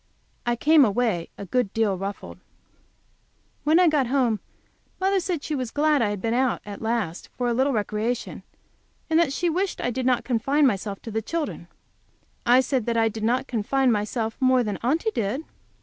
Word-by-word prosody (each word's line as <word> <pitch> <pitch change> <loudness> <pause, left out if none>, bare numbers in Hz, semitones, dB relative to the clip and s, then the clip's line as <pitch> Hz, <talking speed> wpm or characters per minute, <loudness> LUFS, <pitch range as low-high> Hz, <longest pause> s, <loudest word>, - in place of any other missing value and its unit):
I 240 - +2
came 305 +4 +5
away 215 -6 0
a 200 - -7
good 240 +1 0
deal 220 -3 +2
ruffled. 185 - -6 1.2
When 310 +4 +4
I 360 - +5
got 295 -5 +2
home 245 -5 +1 0.6
mother 385 +1 +2
said 350 -5 -3
she 310 - -3
was 255 -5 -2
glad 295 +1 +2
I 215 - +2
had 205 -1 -3
been 225 +4 -1
out 255 0 +1
at 205 -1 -8
last 220 -7 -2
for 245 - 0
a 240 - +1
little 265 +4 +2
recreation, 220 +1 -2 0.7
and 320 - +5
that 335 -5 +2
she 350 +5 -1
wished 365 +4 -1
I 245 - -1
did 255 +1 -2
not 250 -2 +2
confine 270 +5 +2
myself 200 -4 0
so - - -32
to 225 - -6
the 220 +1 -1
children. 325 +7 -4 0.8
I 250 +2 +6
said 260 -3 -1
that 235 -1 0
I 225 0 +3
did 220 0 -7
not 250 +4 +1
confine 260 +2 +1
myself 220 +1 -1
more 255 -1 +4
than 205 -3 -3
Aunty 320 - +1
did. 230 +8 -2
245 Hz, 195 wpm, -24 LUFS, 220-280 Hz, 1.2 s, I